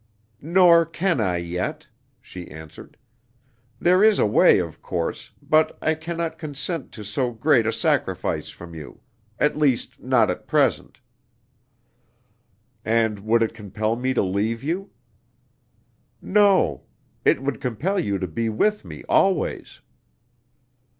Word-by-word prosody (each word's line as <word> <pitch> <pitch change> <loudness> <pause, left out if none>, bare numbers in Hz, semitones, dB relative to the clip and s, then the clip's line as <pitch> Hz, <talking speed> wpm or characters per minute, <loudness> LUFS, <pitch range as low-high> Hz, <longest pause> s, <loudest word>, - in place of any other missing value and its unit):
"Nor 170 +1 +5
can 170 -4 0
I 90 -4 0
yet," 85 +1 -4 0.3
she 90 -2 -10
answered. 80 -1 -12 0.8
"There 185 +3 +4
is 215 -1 +5
a - - +3
way, 105 - +5
of 85 -4 -4
course, - - -4
but 155 0 +2
I 160 - +1
can 165 +2 -6
not 165 -1 -3
consent 155 +1 -4
to 110 - -8
so 120 +5 -1
great 120 0 +2
a - - +2
sacrifice - - -1
from 85 -1 -11
you; 75 -3 -11 0.4
at 150 - +1
least, 140 -5 0
not - - +2
at - - -8
present." - - 0 1.8
"And 110 -2 +1
would 115 +3 +2
it 115 - -2
compel 110 +1 -3
me 130 +2 -2
to - - +2
leave 105 +5 -1
you?" 180 +7 -3 1.3
"No; 200 - +3 0.4
it - - +2
would 140 -1 -3
compel 160 - -1
you 100 - -1
to 95 -1 -3
be 115 +8 -2
with 210 - 0
me - - -10
always." 190 -2 0
120 Hz, 135 wpm, -23 LUFS, 105-165 Hz, 1.8 s, Nor